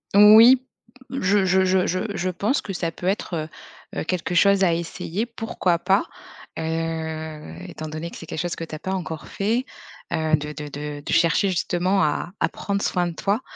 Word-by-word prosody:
Oui 220 Hz, +5 st, +9 dB, 0.5 s
je 205 Hz, -6 st, +2 dB
je 190 Hz, +1 st, +3 dB
je 185 Hz, 0 st, +2 dB
je 185 Hz, +1 st, 0 dB
je 185 Hz, 0 st, -1 dB
pense 205 Hz, -, 0 dB
que 200 Hz, -, -6 dB
ça 175 Hz, -3 st, -2 dB
peut 175 Hz, -, -6 dB
être, 195 Hz, -1 st, -1 dB, 0.6 s
heu, -, -, -2 dB
heu, -, -, -2 dB
quelque 180 Hz, +1 st, -2 dB
chose 200 Hz, +2 st, +5 dB
à 175 Hz, -3 st, +4 dB
essayer 170 Hz, +4 st, -3 dB
pourquoi 225 Hz, -7 st, -1 dB
pas. 190 Hz, +3 st, +2 dB, 0.5 s
Heu, 160 Hz, -, -4 dB
étant 155 Hz, -, -7 dB
donné 155 Hz, +2 st, -5 dB
que -, -, -9 dB
c'est 165 Hz, -, -10 dB
quelque 160 Hz, -, -5 dB
chose 175 Hz, 0 st, -2 dB
que -, -, -6 dB
tu 160 Hz, -, -6 dB
as -, -, -8 dB
pas 190 Hz, -, -4 dB
encore 160 Hz, -4 st, -5 dB
fait, 225 Hz, +6 st, -1 dB, 0.5 s
heu, 160 Hz, -1 st, +2 dB
de 150 Hz, 0 st, -5 dB
de 150 Hz, 0 st, -7 dB
de 145 Hz, 0 st, -6 dB
de -, -, -4 dB
chercher 170 Hz, +4 st, +3 dB
justement 185 Hz, +1 st, +1 dB
à 150 Hz, +3 st, -1 dB
à -, -, +3 dB
prendre 200 Hz, 0 st, -3 dB
soin 180 Hz, -1 st, +1 dB
de 170 Hz, -, -4 dB
toi, 205 Hz, +7 st, 0 dB
175 Hz, 200 wpm, -23 LUFS, 160-195 Hz, 0.6 s, Oui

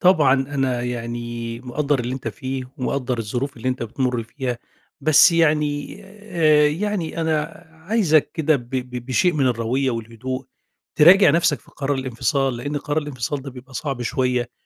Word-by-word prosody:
طبعًا 160 Hz, -8 st, +5 dB
أنا 135 Hz, -2 st, -1 dB
يعني، 120 Hz, -1 st, -4 dB
مقدّر 140 Hz, +2 st, -1 dB
اللي 125 Hz, +2 st, -3 dB
أنت 125 Hz, -4 st, -4 dB
فيه 130 Hz, +4 st, -5 dB
ومقدّر 125 Hz, -1 st, -2 dB
الظروف 120 Hz, +6 st, -3 dB
اللي 125 Hz, +2 st, -3 dB
أنت 125 Hz, -1 st, -2 dB
بتمُرّ 125 Hz, +1 st, -1 dB
فيها، 125 Hz, +1 st, -4 dB, 0.4 s
بس 155 Hz, +3 st, +6 dB
يعني 150 Hz, -3 st, +1 dB
آآ 160 Hz, -8 st, +2 dB
يعني 175 Hz, 0 st, -2 dB
أنا 155 Hz, -2 st, +1 dB, 0.4 s
عايزك 180 Hz, -9 st, +3 dB
كده 155 Hz, -1 st, +2 dB
ب 120 Hz, -2 st, -10 dB
ب 125 Hz, -2 st, -4 dB
بشيء 175 Hz, +7 st, +2 dB
من 145 Hz, -4 st, +1 dB
الرويّة 125 Hz, +2 st, 0 dB
والهدوء 115 Hz, +3 st, -5 dB, 0.5 s
تراجع 185 Hz, +6 st, +8 dB
نَفْسك 165 Hz, -3 st, +2 dB
في -, -, -21 dB
قرار 140 Hz, 0 st, -2 dB
الانفصال، 130 Hz, +1 st, 0 dB
لأن 145 Hz, +5 st, -4 dB
قرار 145 Hz, +1 st, -1 dB
الانفصال 145 Hz, -2 st, -3 dB
ده 135 Hz, -, -7 dB
بيبقى 130 Hz, +1 st, -13 dB
صعب 135 Hz, -1 st, -3 dB
شوية، 125 Hz, -1 st, 0 dB
135 Hz, 155 wpm, -22 LUFS, 125-150 Hz, 0.5 s, تراجع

